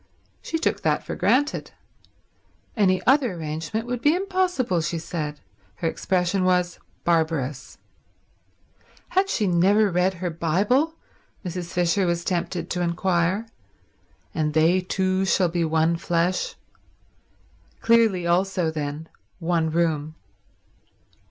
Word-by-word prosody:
She 325 - -2
took 325 - -1
that - - +1
for - - -5
granted. 290 +3 +1 1.1
Any 185 -4 +2
other 265 -5 +4
arrangement 160 +6 -4
would 245 0 -3
be 295 +3 +4
impossible, 360 - 0
she 165 +2 -2
said; 155 -2 -4 0.4
her 165 - -2
expression 185 +2 0
was, 180 -1 +1 0.2
Barbarous. 155 -5 -1 1.3
Had 385 +1 +1
she 215 - 0
never 195 +4 +3
read 180 +2 +1
her 175 0 -3
Bible, 205 - +1 0.5
Mrs. 175 -1 -5
Fisher 180 +2 +1
was 170 0 -1
tempted 175 -1 -2
to 180 - -1
inquire—And 170 -3 -3
they 165 +4 +4
two 185 +1 0
shall 190 -2 +2
be 170 0 0
one 160 +1 +2
flesh? 175 +2 0 1.2
Clearly 225 -6 +3
also, 175 -1 +1
then, 150 0 -4 0.3
one 165 -2 0
room. 155 -2 0
180 Hz, 115 wpm, -24 LUFS, 165-195 Hz, 1.3 s, other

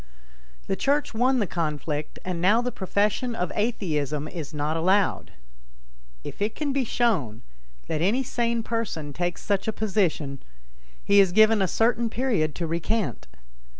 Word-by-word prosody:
The - - -1
Church 285 +5 0
won 255 +4 +2
the 220 - +2
conflict 150 -3 -3
and 180 -2 -3
now 205 +6 +4
the 250 +1 -1
profession 210 +5 0
of 180 -5 -2
atheism 155 - -1
is 160 -3 -6
not 150 +1 -2
allowed. 190 +5 +2 0.9
If - - -8
it 210 +2 0
can 290 -3 -2
be 275 -1 +1
shown 190 - 0 0.4
that 155 -1 -2
any 220 +10 +2
sane 235 -2 -1
person 210 -11 -3
takes 175 +3 -3
such 200 -1 0
a - - +2
position, 180 -11 -1 0.6
he 200 0 +5
is 195 -2 +5
given 215 +2 +5
a 190 - +3
certain 230 +3 +1
period 220 - 0
to 170 - -3
recant. 170 +6 -2
200 Hz, 150 wpm, -25 LUFS, 165-230 Hz, 0.9 s, he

